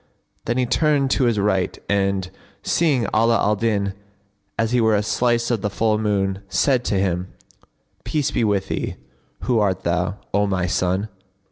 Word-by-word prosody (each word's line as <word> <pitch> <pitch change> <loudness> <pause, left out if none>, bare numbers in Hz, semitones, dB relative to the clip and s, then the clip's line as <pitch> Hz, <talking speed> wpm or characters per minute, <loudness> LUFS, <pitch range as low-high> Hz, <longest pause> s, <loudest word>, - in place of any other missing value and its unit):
Then 120 +2 -1
he 130 - +2
turned 145 0 +2
to 130 - +2
his 120 -3 +2
right 95 -2 0
and, 100 -2 0 0.3
seeing 150 -8 +2
Ala 115 +1 +4
al 105 +1 +2
Din 100 -2 0 0.6
as 115 0 0
he 125 -1 +3
were 110 -1 +3
a 105 - +1
slice 120 +2 +1
of 115 -4 0
the 105 - -1
full 110 +1 +1
moon, 100 -3 0
said 130 +3 +2
to - - 0
him, 95 -1 -1 0.7
"Peace 150 -4 -1
be - - 0
with 100 -3 0
thee! - - -3 0.5
who 120 -3 +1
art 95 -3 0
thou, 90 +3 -1 0.2
O 100 +1 +2
my 95 -2 0
son?" 90 +2 0
105 Hz, 170 wpm, -22 LUFS, 95-120 Hz, 0.7 s, Ala